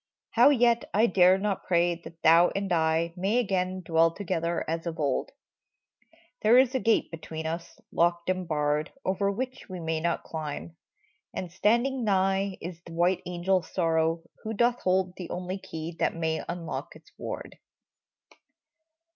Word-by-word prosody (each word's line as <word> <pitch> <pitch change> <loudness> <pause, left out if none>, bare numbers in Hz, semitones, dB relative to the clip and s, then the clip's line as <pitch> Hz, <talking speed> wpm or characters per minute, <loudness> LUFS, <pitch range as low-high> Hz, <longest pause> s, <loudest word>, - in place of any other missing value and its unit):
How - - +6
yet 235 -4 +3
I 215 +3 +5
dare 185 -3 +5
not 195 -1 -2
pray 175 0 +3
that 170 -1 -12
thou 170 +2 +6
and 195 -2 -1
I 165 0 +1
Again 195 -4 +1
may 185 - -6
dwell 165 0 +4
together 170 -2 -2
as 165 +1 -3
of 165 -1 -5
old? 140 -3 0 1.1
There 225 +3 +6
is 260 0 +5
a 260 - +1
gate 230 -2 +2
between 160 -1 -7
us, 165 +2 -5
locked 170 0 +1
and 185 -1 -1
barred. 150 -1 0
Over 200 +1 +1
which 255 +5 -5
we 185 -1 -6
may 160 -1 -1
not 170 +1 -1
climb; 145 - -6 0.6
and 180 -2 -4
standing 235 +8 +1
nigh 195 -1 +1
Is 170 0 -7
the 170 - -11
white 175 +2 +2
angel 180 +1 +1
Sorrow, 165 -2 0 0.2
who 220 - -4
doth 240 +3 +2
hold 185 0 +1
The 180 - -7
only 180 +2 -4
key 165 -3 -7
that - - +1
may 160 -1 -1
unlock 170 -2 -5
its - - -17
ward - - -6
180 Hz, 160 wpm, -28 LUFS, 165-195 Hz, 1.1 s, How